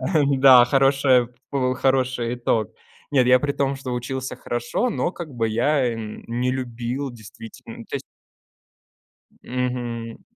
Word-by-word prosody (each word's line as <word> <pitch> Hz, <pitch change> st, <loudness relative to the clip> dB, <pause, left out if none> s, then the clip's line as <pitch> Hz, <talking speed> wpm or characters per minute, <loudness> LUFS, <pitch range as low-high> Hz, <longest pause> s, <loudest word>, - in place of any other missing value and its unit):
а, 155 Hz, +5 st, +1 dB
эм, 140 Hz, -2 st, +2 dB
да, 130 Hz, -3 st, +9 dB
хорошая 135 Hz, -1 st, +3 dB, 0.2 s
п 130 Hz, -2 st, 0 dB
хороший 130 Hz, -2 st, 0 dB
итог. 115 Hz, -4 st, 0 dB, 0.4 s
Нет, 130 Hz, -4 st, +3 dB
я 125 Hz, 0 st, +5 dB
при 145 Hz, -1 st, -1 dB
том, 140 Hz, -1 st, -1 dB
что 130 Hz, -2 st, -6 dB
учился 130 Hz, +2 st, -4 dB
хорошо, 120 Hz, -, -2 dB
но 175 Hz, -, -1 dB
как 160 Hz, -5 st, -8 dB
бы 115 Hz, -1 st, 0 dB
я, 125 Hz, +5 st, +1 dB
эм, 110 Hz, -2 st, -7 dB
не 125 Hz, +2 st, -1 dB
любил 125 Hz, +1 st, -4 dB
действительно, 110 Hz, -1 st, -12 dB
ну, -, -, -9 dB
то -, -, -4 dB
есть -, -, -6 dB, 1.4 s
Мгм. 120 Hz, -2 st, -4 dB
125 Hz, 150 wpm, -23 LUFS, 120-135 Hz, 1.4 s, да